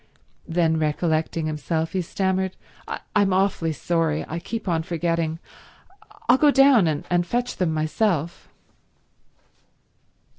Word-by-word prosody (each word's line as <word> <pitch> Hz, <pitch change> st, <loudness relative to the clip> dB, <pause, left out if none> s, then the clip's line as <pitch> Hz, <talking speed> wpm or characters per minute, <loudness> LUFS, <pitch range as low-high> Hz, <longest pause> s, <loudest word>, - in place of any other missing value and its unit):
Then, 165 Hz, -2 st, +1 dB
recollecting 160 Hz, +1 st, 0 dB
himself, 160 Hz, +1 st, -2 dB
he 190 Hz, -, -1 dB
stammered, 190 Hz, +1 st, -1 dB, 0.6 s
"I'm 200 Hz, -2 st, +3 dB
awfully 185 Hz, -4 st, +1 dB
sorry—I 165 Hz, 0 st, -1 dB
keep 220 Hz, +4 st, -6 dB
on 165 Hz, -3 st, +1 dB
forgetting—I'll 170 Hz, -, -3 dB
go 300 Hz, -, +6 dB
down 270 Hz, -, +5 dB
and 165 Hz, +3 st, 0 dB
fetch 240 Hz, +7 st, -2 dB
them 180 Hz, -3 st, +1 dB
myself." 160 Hz, +1 st, -1 dB
170 Hz, 100 wpm, -23 LUFS, 160-195 Hz, 0.6 s, go